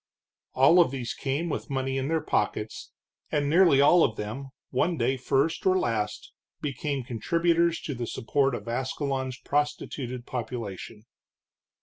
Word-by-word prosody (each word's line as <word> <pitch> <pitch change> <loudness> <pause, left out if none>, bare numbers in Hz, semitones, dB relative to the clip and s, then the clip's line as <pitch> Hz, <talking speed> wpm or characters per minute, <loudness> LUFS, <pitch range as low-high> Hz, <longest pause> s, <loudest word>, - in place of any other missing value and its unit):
All 135 +7 +6
of 170 - +3
these 125 -3 -4
came 145 +5 -2
with 155 - -4
money 135 -1 -1
in 135 - -2
their 160 0 +1
pockets, 105 +1 -2 0.4
and 145 -1 +1
nearly 165 -3 +5
all 165 +4 +6
of 110 - +1
them, 110 +6 -5 0.2
one 165 +6 +1
day 125 +2 +1
first 135 +5 0
or 185 0 +4
last, 110 - -2 0.3
became 140 -1 -3
contributors 170 +8 +1
to 145 - -4
the 120 -2 -4
support 135 +3 0
of 120 - -8
Ascalon's 130 +1 -2
prostituted 130 -4 -2
population. 110 -3 -6
135 Hz, 140 wpm, -27 LUFS, 120-150 Hz, 0.4 s, All